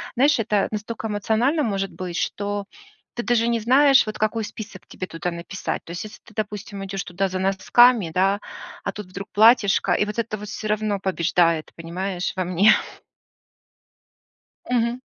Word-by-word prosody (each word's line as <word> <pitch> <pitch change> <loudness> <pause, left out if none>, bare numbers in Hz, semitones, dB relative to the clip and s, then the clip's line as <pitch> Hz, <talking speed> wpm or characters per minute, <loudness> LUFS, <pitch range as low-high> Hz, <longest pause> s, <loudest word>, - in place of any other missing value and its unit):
знаешь, 275 +2 +4
это 210 -2 +1
настолько 220 +1 -4
эмоционально 225 +8 +1
может 195 -4 -1
быть, 180 -2 -5
что 205 0 -2 0.5
ты 240 - -3
даже 235 -1 +2
не 235 -1 +1
знаешь, 270 +4 +5
вот 215 0 -4
какой 215 +1 0
список 205 -3 -9
тебе 185 - -6
туда 175 +1 -4
написать. 170 +2 -5
То - - -9
есть, 175 - -5
если 215 - -11
ты, - - -17
допустим, 205 -2 -5
идёшь 195 0 -4
туда 190 +2 -1
за 185 0 -4
носками, 195 +1 +4
да, 195 +3 +2 0.4
а - - -2
тут 210 -2 -8
вдруг 195 +2 -8
платьишко, 215 -1 +5
и 210 - +2
вот 210 +2 -6
это 215 -2 -2
вот 210 - -8
всё 215 - -5
равно 210 -1 0
побеждает, 170 -3 +1
понимаешь, 180 +2 -4
во 185 - +1
мне. 185 +4 +5 2.0
Мгм. 240 0 +1
205 Hz, 165 wpm, -23 LUFS, 190-225 Hz, 2.0 s, знаешь